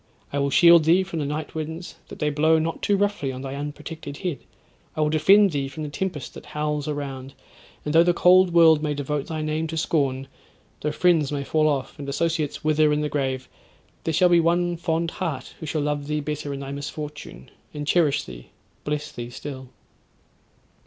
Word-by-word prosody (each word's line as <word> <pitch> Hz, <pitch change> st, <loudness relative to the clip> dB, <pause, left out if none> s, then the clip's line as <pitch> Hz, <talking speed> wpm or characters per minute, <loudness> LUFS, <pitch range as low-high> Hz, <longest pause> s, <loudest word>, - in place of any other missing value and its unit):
I 140 Hz, -, 0 dB
will 140 Hz, 0 st, +1 dB
shield 170 Hz, +2 st, +7 dB
thee 175 Hz, +4 st, +5 dB
from 180 Hz, -3 st, -5 dB
the 145 Hz, -, -2 dB
night 150 Hz, +1 st, -4 dB
winds, 160 Hz, +2 st, -6 dB
that -, -, -10 dB
they 150 Hz, -1 st, 0 dB
blow 155 Hz, +2 st, +3 dB
not 160 Hz, +1 st, -2 dB
too 205 Hz, -, +2 dB
roughly 205 Hz, -9 st, 0 dB
on 130 Hz, +1 st, -7 dB
thy 135 Hz, 0 st, -5 dB
unprotected 145 Hz, +1 st, -7 dB
head. 175 Hz, -5 st, -3 dB, 0.6 s
I 155 Hz, -, -1 dB
will 150 Hz, 0 st, +2 dB
defend 195 Hz, +6 st, +5 dB
thee 140 Hz, -2 st, -1 dB
from 155 Hz, +3 st, -7 dB
the 150 Hz, -, -4 dB
tempest 170 Hz, -1 st, -4 dB
that -, -, -11 dB
howls 150 Hz, -1 st, -1 dB
around; 135 Hz, -3 st, -5 dB, 0.5 s
and 150 Hz, -, -2 dB
though 165 Hz, -, +7 dB
the 175 Hz, +1 st, +4 dB
cold 180 Hz, +1 st, +5 dB
world 165 Hz, -3 st, +6 dB
may 150 Hz, -1 st, -1 dB
devote 145 Hz, 0 st, -3 dB
thy 155 Hz, -1 st, -3 dB
name 155 Hz, +1 st, -1 dB
to 160 Hz, +1 st, -5 dB
scorn—though 140 Hz, 0 st, -3 dB
friends 160 Hz, -3 st, +2 dB
may 140 Hz, -1 st, -2 dB
fall 155 Hz, +2 st, +2 dB
off, 140 Hz, -3 st, -2 dB
and 140 Hz, -1 st, -5 dB
associates 155 Hz, 0 st, -1 dB
wither 155 Hz, 0 st, +3 dB
in 150 Hz, 0 st, +1 dB
the 150 Hz, -, -1 dB
grave, 130 Hz, -3 st, -2 dB, 0.6 s
there 165 Hz, -, -1 dB
shall 180 Hz, +3 st, +5 dB
be 175 Hz, -1 st, +5 dB
one 175 Hz, +1 st, +2 dB
fond 165 Hz, 0 st, -1 dB
heart 155 Hz, -9 st, -4 dB
who 160 Hz, -, -7 dB
shall 155 Hz, 0 st, -1 dB
love 145 Hz, -1 st, -2 dB
thee 150 Hz, 0 st, -1 dB
better 150 Hz, -1 st, -4 dB
in 140 Hz, 0 st, -5 dB
thy 135 Hz, 0 st, -6 dB
misfortune, 145 Hz, -, -7 dB, 0.2 s
and 145 Hz, 0 st, -5 dB
cherish 155 Hz, -2 st, +2 dB
thee, -, -, -11 dB, 0.4 s
bless 150 Hz, 0 st, -3 dB
thee 120 Hz, 0 st, -7 dB
still.' 130 Hz, 0 st, -8 dB
150 Hz, 200 wpm, -24 LUFS, 145-165 Hz, 0.6 s, shield